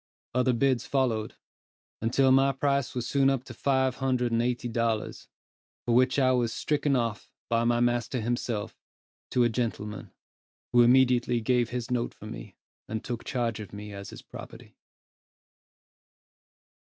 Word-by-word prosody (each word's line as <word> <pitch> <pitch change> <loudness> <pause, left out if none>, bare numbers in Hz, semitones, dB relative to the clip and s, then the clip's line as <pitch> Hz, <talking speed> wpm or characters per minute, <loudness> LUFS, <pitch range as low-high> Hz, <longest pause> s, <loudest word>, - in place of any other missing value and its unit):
Other 125 0 +2
bids 130 0 +1
followed, 120 -6 0 0.7
until 130 +4 +3
my 135 +1 +4
price 140 -1 0
was 125 - -2
soon 135 -1 +3
up 135 -2 0
to 130 - -10
five 130 +1 +1
hundred 125 -2 0
and 115 0 +2
eighty 120 0 -1
dollars, 115 -2 -2 0.6
for 120 - +1
which 130 +3 +4
I 130 -2 +4
was 120 -3 +1
stricken 145 0 0
off, 115 -4 -2 0.2
by 115 0 +2
my 120 0 +2
master 120 +1 +1
himself, 115 -2 -2 0.5
to 125 - +2
a 120 - +3
gentleman, 110 -3 -3 0.6
who 120 - +7
immediately 125 -1 +4
gave 120 0 +1
his 125 0 -4
note 120 -1 -1
for - - -12
me, - - -8 0.3
and 110 0 -4
took 120 -3 -4
charge 115 -3 -2
of 105 -3 -9
me 105 0 -8
as 100 0 -8
his - - -11
property. - - -11
120 Hz, 150 wpm, -28 LUFS, 115-130 Hz, 0.7 s, who